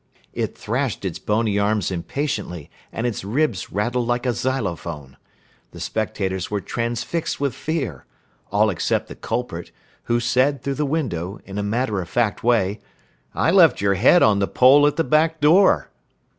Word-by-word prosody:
It -, -, -3 dB
thrashed -, -, -2 dB
its -, -, -3 dB
bony 105 Hz, -1 st, 0 dB
arms 105 Hz, -1 st, 0 dB
impatiently 90 Hz, -, -4 dB, 0.2 s
and 115 Hz, -, -3 dB
its 120 Hz, -6 st, -2 dB
ribs 115 Hz, -1 st, -1 dB
rattled 120 Hz, +4 st, -1 dB
like 120 Hz, +1 st, -1 dB
a 125 Hz, -, +1 dB
xylophone. 85 Hz, -, -3 dB, 0.6 s
The -, -, -10 dB
spectators 95 Hz, -4 st, -2 dB
were 105 Hz, -, -1 dB
transfixed 120 Hz, -, -3 dB
with 140 Hz, -3 st, 0 dB
fear, 135 Hz, -, -4 dB, 0.5 s
all 105 Hz, +1 st, +3 dB
except 85 Hz, -, -1 dB
the -, -, -8 dB
culprit, 90 Hz, -9 st, -4 dB, 0.4 s
who 120 Hz, 0 st, +1 dB
said, 130 Hz, +3 st, +1 dB
through 140 Hz, -, -1 dB
the 150 Hz, +2 st, -1 dB
window, 105 Hz, -, -3 dB
in 100 Hz, +1 st, -6 dB
a -, -, 0 dB
matter 105 Hz, -1 st, -1 dB
of 85 Hz, -, -8 dB
fact 120 Hz, -4 st, 0 dB
way, 110 Hz, -4 st, +2 dB, 0.6 s
"I -, -, +2 dB
left 170 Hz, -7 st, +5 dB
your 100 Hz, 0 st, +2 dB
head 120 Hz, -, +5 dB
on 105 Hz, -2 st, +4 dB
the 100 Hz, -, +1 dB
pole 140 Hz, +3 st, +6 dB
at 145 Hz, -, 0 dB
the 165 Hz, -, +1 dB
back 160 Hz, +1 st, +2 dB
door." 175 Hz, +7 st, +4 dB
115 Hz, 165 wpm, -22 LUFS, 100-140 Hz, 0.6 s, pole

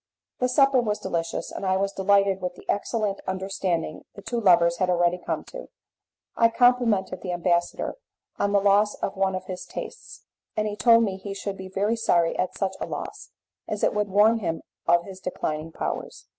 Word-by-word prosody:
The 250 Hz, -, +1 dB
supper 270 Hz, -1 st, +4 dB
was 210 Hz, -3 st, -1 dB
delicious, 165 Hz, -1 st, -3 dB
and -, -, -6 dB
I 190 Hz, -1 st, +2 dB
was 195 Hz, +1 st, 0 dB
delighted 195 Hz, 0 st, +2 dB
with 180 Hz, -1 st, -3 dB
the -, -, -15 dB
excellent 205 Hz, -1 st, -1 dB
understanding 190 Hz, -4 st, -2 dB
the 200 Hz, -, -11 dB
two 235 Hz, -1 st, -2 dB
lovers 170 Hz, -3 st, +5 dB
had 185 Hz, 0 st, +1 dB
already 175 Hz, 0 st, +2 dB
come -, -, -3 dB
to. -, -, -8 dB, 0.7 s
I 230 Hz, -, +5 dB
complimented 230 Hz, -6 st, +2 dB
the 185 Hz, -, -4 dB
ambassador 175 Hz, -, 0 dB, 0.4 s
on 200 Hz, -, +1 dB
the 200 Hz, -, +4 dB
loss 205 Hz, +1 st, +3 dB
of 195 Hz, -, -4 dB
one 190 Hz, -1 st, +1 dB
of 185 Hz, 0 st, -5 dB
his 185 Hz, -1 st, -6 dB
tastes, -, -, -8 dB, 0.3 s
and 215 Hz, 0 st, +1 dB
he 205 Hz, -, -3 dB
told 230 Hz, +1 st, +5 dB
me 195 Hz, -3 st, -1 dB
he 195 Hz, 0 st, -7 dB
should 200 Hz, 0 st, -4 dB
be 190 Hz, -1 st, -8 dB
very 205 Hz, +4 st, 0 dB
sorry 175 Hz, -7 st, +2 dB
at 185 Hz, -, -1 dB
such 190 Hz, -1 st, -1 dB
a -, -, -2 dB
loss, -, -, -6 dB, 0.4 s
as -, -, -4 dB
it -, -, +3 dB
would 210 Hz, 0 st, 0 dB
warn 215 Hz, +4 st, +4 dB
him 165 Hz, -5 st, -3 dB, 0.2 s
of 170 Hz, 0 st, +4 dB
his 190 Hz, -1 st, -9 dB
declining 160 Hz, -3 st, -3 dB
powers. -, -, -5 dB
195 Hz, 195 wpm, -25 LUFS, 180-210 Hz, 0.7 s, lovers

